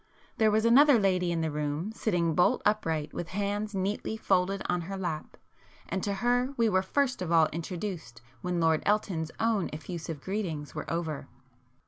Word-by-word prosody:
There 220 -1 +4
was 215 +1 +2
another 270 +3 +7
lady 185 -4 +2
in 165 -1 0
the 160 -1 -1
room 150 +6 -2
sitting 175 -7 0
bolt 180 +3 +3
upright 160 -8 0
with 175 - -4
hands 205 +2 -2
neatly 200 +3 -2
folded 195 -1 +1
on 180 0 0
her 195 - -4
lap, 170 -5 -4 0.5
and 190 +2 -2
to 200 +1 -1
her 245 +3 +2
we 230 -1 +3
were 185 -3 +3
first 255 +5 0
of 175 -2 -3
all 165 -1 +6
introduced 170 - -5 0.2
when 180 -1 -1
Lord 160 -1 +3
Elton's 195 -6 0
own 225 -4 +1
effusive 160 0 -6
greetings 170 -5 -4
were - - -5
over. 160 -4 -3
185 Hz, 170 wpm, -29 LUFS, 165-210 Hz, 0.5 s, another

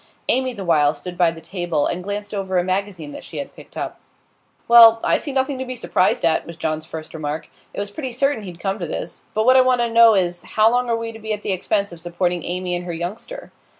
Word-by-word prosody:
Amy, 260 0 +3
the 200 -6 -7
while, 150 -3 +3
stood 180 -1 -8
by 175 -1 +4
the 165 0 -8
table, 175 -4 -2
and 180 +1 -2
glanced 205 +2 -5
over 190 -2 -1
a 175 - +3
magazine 185 -4 -3
that - - -9
she - - -9
had - - -6
picked - - -14
up. - - -5 0.7
'Well, 230 -1 +9
I - - +3
see 290 - -5
nothing 265 0 -1
to - - -2
be 255 0 -5
surprised 185 -7 +1
at,' 160 -2 +1
was 170 -1 -9
John's 155 -1 -3
first 160 -1 -8
remark. 155 -1 -5 0.2
'It - - -7
was 200 0 -4
pretty 260 +1 -5
certain 275 0 0
he'd 180 -4 -9
come 195 +2 -2
to 175 - -3
this. 165 - -6
But 215 +1 +1
what 255 +1 +6
I - - +8
want 255 -1 +3
to 235 - +1
know 230 -1 +7
is, 175 -2 0
how 220 +1 +3
long 245 0 +1
are 230 - +1
we 230 0 -4
to 225 - -11
be 220 0 -3
at 210 - -6
the - - -1
expense 200 +2 0
of 170 - -10
supporting 175 +1 -1
Amy 180 0 -2
and 175 0 -4
her 175 - -4
youngster? 195 - -6
195 Hz, 255 wpm, -21 LUFS, 175-230 Hz, 0.7 s, Well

